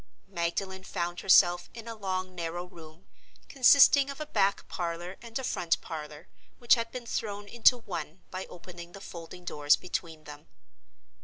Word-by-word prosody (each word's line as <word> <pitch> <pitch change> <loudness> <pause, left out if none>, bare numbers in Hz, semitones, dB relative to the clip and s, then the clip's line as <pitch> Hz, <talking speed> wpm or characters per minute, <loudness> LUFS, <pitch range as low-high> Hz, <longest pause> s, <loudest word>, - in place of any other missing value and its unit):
Magdalen 190 +1 -3
found 175 -1 -3
herself 175 -2 +5
in 230 -1 -9
a 230 - -5
long, 185 -3 -3
narrow 175 0 -4
room, 165 -1 -14 0.4
consisting 280 +1 +6
of 280 - -7
a 305 - -3
back 200 -8 +1
parlor 175 +1 -4
and 230 -1 -6
a 265 - -4
front 175 -8 0
parlor, 155 0 -8 0.3
which 240 - +4
had 230 -2 +1
been 250 -2 -7
thrown 205 -3 -4
into 235 +3 +5
one 175 -6 -7
by 185 0 -5
opening 175 -1 -11
the 195 - -9
folding 175 0 -10
doors 145 -3 +3
between 165 -3 -5
them. 150 -1 -11
185 Hz, 160 wpm, -29 LUFS, 170-220 Hz, 0.4 s, consisting